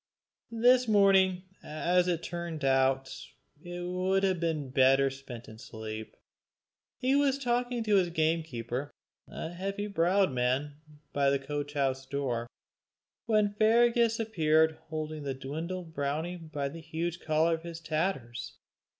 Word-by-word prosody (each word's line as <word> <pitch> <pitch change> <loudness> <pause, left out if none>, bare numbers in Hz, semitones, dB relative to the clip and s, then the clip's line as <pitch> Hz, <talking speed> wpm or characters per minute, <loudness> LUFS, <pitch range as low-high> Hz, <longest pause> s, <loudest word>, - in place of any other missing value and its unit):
This 250 +2 +5
morning, 190 -3 +4 0.2
as 175 +4 +1
it 170 -2 -1
turned 170 -4 -4
out, 135 0 +3 0.5
it 175 +1 -6
would 185 +2 0
have 190 -2 +2
been 155 -5 -2
better 135 +1 +4
spent 130 -3 -9
in 110 0 -12
sleep. 110 -2 -7 0.8
He 260 +2 +1
was 280 -1 +3
talking 245 -2 -1
to 210 -2 +3
his 180 -2 +2
gamekeeper, 155 -6 -1 0.4
a 165 - -6
heavy 195 +3 -3
browed 195 -2 +2
man, 130 +4 -1 0.4
by 140 -1 +3
the 140 - +3
coach 145 +1 -5
house 135 -2 0
door, 130 -4 -2 0.8
when 210 -2 +2
Fergus 230 +1 +3
appeared 160 -7 +2
holding 155 -1 -4
the 140 -2 -3
dwindled 160 +6 -5
brownie 155 +4 -2
by 155 -4 -4
the 165 +4 -8
huge 165 +2 -3
collar 160 +1 +2
of 160 - -3
his 165 -1 -7
tatters. 155 -7 -3
160 Hz, 135 wpm, -30 LUFS, 140-190 Hz, 0.8 s, This